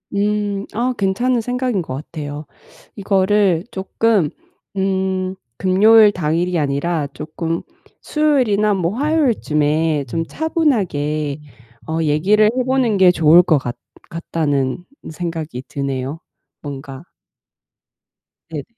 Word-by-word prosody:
음. 205 Hz, 0 st, 0 dB
아 245 Hz, +3 st, 0 dB
괜찮은 230 Hz, +6 st, +1 dB
생각인 245 Hz, -4 st, -1 dB
것 145 Hz, -, -6 dB
같아요. 150 Hz, 0 st, -7 dB, 0.5 s
이거를 195 Hz, -3 st, +2 dB
쪼끔 195 Hz, -2 st, +1 dB, 0.5 s
음 190 Hz, -1 st, -1 dB, 0.2 s
금요일 210 Hz, +3 st, +6 dB
당일이 170 Hz, 0 st, 0 dB
아니라 145 Hz, +2 st, -1 dB
쪼끔 165 Hz, +2 st, -4 dB, 0.4 s
수요일이나 250 Hz, -9 st, +2 dB
뭐 180 Hz, -1 st, -1 dB
화요일쯤에 160 Hz, -, +1 dB
좀 165 Hz, +6 st, -2 dB
차분하게 170 Hz, -, -1 dB, 0.6 s
얘기를 185 Hz, +8 st, +3 dB
해 255 Hz, -, +1 dB
보는 255 Hz, -5 st, +1 dB
게 185 Hz, -1 st, +6 dB
좋을 165 Hz, 0 st, +6 dB
것 160 Hz, -4 st, +3 dB
같 120 Hz, -2 st, -5 dB, 0.3 s
같다는 155 Hz, -2 st, -2 dB, 0.3 s
생각이 160 Hz, -6 st, -5 dB
드네요 140 Hz, +2 st, -4 dB, 0.4 s
뭔가. 140 Hz, -1 st, -8 dB, 1.5 s
네네. 150 Hz, -3 st, -5 dB
180 Hz, 220 characters per minute, -19 LUFS, 150-210 Hz, 1.5 s, 금요일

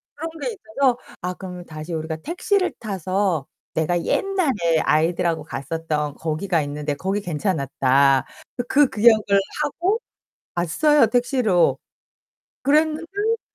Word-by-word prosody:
그런 325 Hz, +2 st, -4 dB
게 -, -, -2 dB
있어서 305 Hz, -, 0 dB, 0.2 s
"아 180 Hz, +1 st, -2 dB
그러면 180 Hz, -2 st, -8 dB
다시 155 Hz, +2 st, -7 dB
우리가 160 Hz, 0 st, -3 dB
택시를 365 Hz, -, 0 dB
타서 190 Hz, -, -1 dB, 0.3 s
내가 170 Hz, +2 st, 0 dB
옛날에 270 Hz, -, +1 dB
아이들하고 165 Hz, +2 st, +1 dB
갔었던 150 Hz, +1 st, -3 dB
거기가 160 Hz, +1 st, -1 dB
있는데 145 Hz, +1 st, -3 dB
거기 195 Hz, +7 st, -2 dB
괜찮았다." 140 Hz, -6 st, +2 dB, 0.4 s
그 285 Hz, +1 st, +5 dB
기억을 220 Hz, 0 st, +5 dB, 0.4 s
하고 355 Hz, +9 st, 0 dB, 0.6 s
왔어요 230 Hz, -, +3 dB
택시로. 240 Hz, -5 st, +2 dB, 0.9 s
그랬는데 330 Hz, +10 st, +1 dB
185 Hz, 270 characters per minute, -22 LUFS, -, 0.9 s, 그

